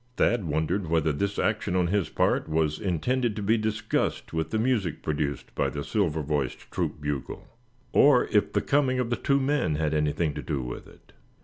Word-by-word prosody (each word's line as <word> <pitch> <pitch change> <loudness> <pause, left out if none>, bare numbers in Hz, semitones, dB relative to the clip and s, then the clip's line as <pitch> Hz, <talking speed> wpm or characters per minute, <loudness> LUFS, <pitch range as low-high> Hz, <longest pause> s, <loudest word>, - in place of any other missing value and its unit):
Thad 115 -5 +2
wondered 80 +5 -1
whether 80 -1 +2
this 100 +7 -2
action 90 - 0
on 90 -1 +3
his 95 +1 0
part - - +1
was 80 -1 0
intended 110 +5 0
to 105 - -4
be 110 +3 +3
disgust 110 -3 -1
with 80 -1 -1
the 110 - -1
music 110 - 0
produced 75 -2 -2
by - - 0
the 70 - -5
silver 80 -7 0
voiced 70 -3 -3
troop - - -2
bugle; 75 -2 -4 0.5
or 140 -3 +6
if 105 - +2
the - - +2
coming 135 -2 +2
of 125 -2 -1
the - - +3
two 140 +4 +1
men 135 - +1
had 75 0 0
anything 75 +1 0
to 75 - -5
do 65 +1 -3
with - - -7
it. - - -20
85 Hz, 195 wpm, -27 LUFS, 75-110 Hz, 0.5 s, or